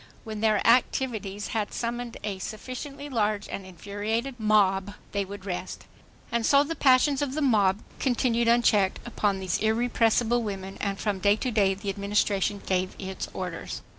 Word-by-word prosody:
When 220 -2 -6
their 215 -2 +2
activities 230 -4 +1
had 215 -2 -2
summoned 240 0 -4
a 200 -2 -3
sufficiently 255 - -6
large 215 -6 0
and 195 -1 -6
infuriated 210 +8 -3
mob, 205 -2 +2 0.2
they 200 0 0
would 195 0 -9
rest. 185 -1 -5 0.5
And 235 0 0
so 280 +5 +5
the 330 +3 -4
passions 270 0 +4
of 280 -2 -2
the 310 - -1
mob 210 -6 +3 0.2
continued 240 -2 +1
unchecked 220 -5 +4
upon 205 -4 0
these 185 -2 -1
irrepressible 230 +1 +2
women, 195 -3 -5
and 200 -1 -1
from 205 -3 -1
day 200 +2 +4
to 250 +3 -2
day 200 -3 +3
the 200 0 -3
Administration 200 0 0
gave 185 0 0
its 190 -1 -5
orders. 180 -3 -5
215 Hz, 160 wpm, -27 LUFS, 195-240 Hz, 0.5 s, so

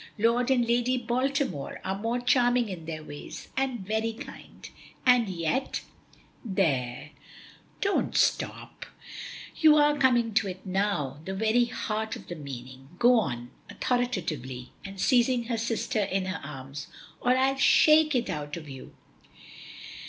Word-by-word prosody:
Lord 235 +3 +2
and 245 -3 +3
Lady 245 +2 +2
Baltimore 255 - -1
are 190 - 0
both 230 +4 -2
charming 245 -2 +3
in 175 -4 -7
their 155 -1 -5
ways, 145 -1 -9
and 260 -4 -1
very 220 +3 -1
kind, 235 +6 -11 0.4
and 245 -4 +5
yet 180 +9 -1 0.4
" - - -31 0.2
"There, 135 -4 0 0.7
don't 400 0 +1
stop; - - 0 0.7
you 310 -1 +7
are 295 0 +4
coming 240 -5 +3
to 205 -1 +2
it 185 +1 -7
now, 185 -8 -1
the 190 - -4
very 220 +4 +3
heart 220 -1 -3
of - - -12
the 175 - -4
meaning. 130 -2 -9
Go 240 +2 +5
on," 120 - -4 0.2
authoritatively, 155 - -2
and 195 0 -9
seizing 245 +2 +3
her 230 0 -2
sister 230 0 -1
in 195 -1 -1
her 190 +1 -4
arms, 140 0 -7 0.3
"or 250 +1 +3
I'll 270 +1 +2
shake 305 +2 +5
it 245 -2 +1
out 150 0 -4
of 155 -2 -9
you." 135 -2 -10
220 Hz, 145 wpm, -28 LUFS, 155-245 Hz, 0.7 s, you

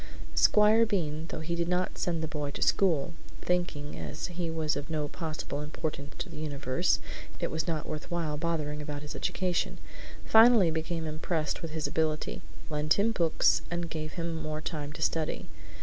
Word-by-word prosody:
Squire 215 +2 +6
Bean, 170 -9 0
although - - -4
he 170 +2 -2
did 170 0 0
not 180 +1 0
send 165 -2 0
the - - -1
boy 150 -2 -3
to - - -2
school 165 -5 +3 0.3
(thinking, 175 -5 -1
as - - -4
he 170 -1 -2
was 160 -1 0
of 145 +2 -4
no 155 -2 -1
possible 155 -2 -4
importance 150 -1 -4
in - - -12
the - - -7
universe, 140 -4 +1 0.4
it - - -1
was 160 -1 -1
not 160 -3 -1
worth 155 -1 -5
while 165 -3 -1
bothering 150 -2 -1
about 145 0 -5
his 150 - -6
education), 180 -2 0 0.5
finally 220 -6 +7
became 160 +1 -2
impressed 155 0 -1
with 165 - -4
his 155 -1 -3
ability, 155 -1 0 0.3
lent 150 0 +2
him 210 +3 +3
books, 170 -7 +3
and 170 -1 -3
gave 155 -1 -4
him 170 -1 -2
more 155 -1 -3
time 150 -2 -4
to 155 +1 -3
study. 160 -1 -1
160 Hz, 180 wpm, -30 LUFS, 150-170 Hz, 0.5 s, finally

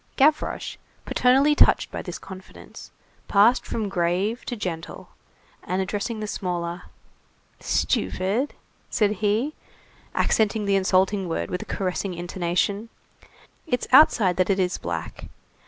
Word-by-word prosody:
Gavroche, 300 +3 +1 0.3
paternally 270 +4 +4
touched - - +4
by - - -4
this - - -6
confidence, 190 -1 -12 0.4
passed 215 +5 +4
from 220 -2 -2
grave 190 +5 -1
to 245 - -4
gentle, 175 -6 -6 0.5
and 185 +1 -2
addressing 205 +4 -2
the 215 - -3
smaller:— 175 -3 -4 0.7
"Stupid," 210 +10 0 0.3
said 210 -2 +2
he, 220 +8 +1 0.6
accenting 215 -1 +1
the 200 0 +2
insulting 190 0 +2
word, 165 - -3
with 180 - -2
a - - -7
caressing 185 0 -3
intonation, 180 +5 -2 0.8
"it's 250 -5 -1
outside 225 - +6
that 185 +1 +2
it 195 - +2
is 180 -2 0
black. 85 -2 -5
195 Hz, 120 wpm, -24 LUFS, 180-220 Hz, 0.8 s, outside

